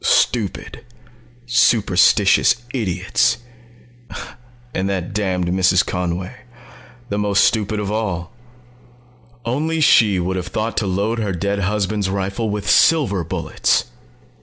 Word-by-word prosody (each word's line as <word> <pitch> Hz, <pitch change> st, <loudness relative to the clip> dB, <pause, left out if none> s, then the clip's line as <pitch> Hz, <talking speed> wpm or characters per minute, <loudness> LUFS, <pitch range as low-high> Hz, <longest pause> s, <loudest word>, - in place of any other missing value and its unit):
Stupid, 110 Hz, -6 st, 0 dB, 0.6 s
superstitious 105 Hz, -4 st, +3 dB, 0.2 s
idiots... 110 Hz, +1 st, 0 dB, 1.4 s
and 95 Hz, +1 st, -1 dB
that 90 Hz, -2 st, -3 dB
damned 95 Hz, -4 st, -1 dB
Mrs. 95 Hz, +1 st, +3 dB
Conway 90 Hz, +5 st, -4 dB, 0.7 s
the 100 Hz, -, -2 dB
most 100 Hz, -1 st, +2 dB
stupid 105 Hz, -1 st, +1 dB
of 105 Hz, -1 st, -3 dB
all. 100 Hz, -5 st, -3 dB, 1.1 s
_Only 155 Hz, +7 st, -1 dB
she 105 Hz, -9 st, +4 dB
would 95 Hz, +2 st, -2 dB
have 90 Hz, -1 st, -4 dB
thought 110 Hz, +5 st, -3 dB
to 105 Hz, -, 0 dB
load 100 Hz, +5 st, -1 dB
her 105 Hz, -3 st, -2 dB
dead 100 Hz, +3 st, -2 dB
husband's 100 Hz, 0 st, -1 dB
rifle 100 Hz, +3 st, -2 dB
with 105 Hz, -1 st, -4 dB
silver 115 Hz, -, +3 dB
bullets! 80 Hz, -, 0 dB
100 Hz, 110 wpm, -19 LUFS, 95-110 Hz, 1.4 s, she